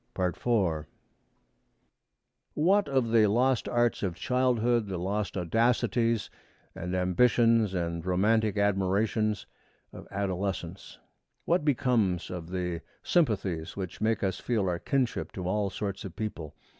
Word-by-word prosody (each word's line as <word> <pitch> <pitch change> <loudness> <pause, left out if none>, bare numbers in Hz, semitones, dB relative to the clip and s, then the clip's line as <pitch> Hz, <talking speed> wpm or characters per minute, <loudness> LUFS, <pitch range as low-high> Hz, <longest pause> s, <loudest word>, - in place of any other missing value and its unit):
IV 90 -3 0 1.7
What 195 +7 +3
of 130 -4 +1
the 110 -2 +5
lost 125 +4 +2
arts 120 -1 +1
of 95 -4 -2
childhood, 120 0 +1
the 95 -2 -3
lost 100 +3 -2
audacities 115 +4 +1 0.4
and 90 +2 -4
ambitions 115 +3 +3
and 85 -2 -2
romantic 105 +4 +2
admirations 100 +2 +1 0.5
of - - -10
adolescence? 95 -2 -4 0.5
What 170 -2 +2
becomes 120 - +1
of 85 -2 -6
the 90 -2 -3 0.2
sympathies 100 - 0
which 95 -3 -6
make 110 0 +1
us 95 -1 -1
feel 110 -6 0
our 85 -1 -1
kinship 130 +2 -1
to 90 -2 -4
all 100 +1 0
sorts 100 0 -4
of 95 - -8
people? 85 -9 -5
100 Hz, 120 wpm, -28 LUFS, 90-115 Hz, 1.7 s, the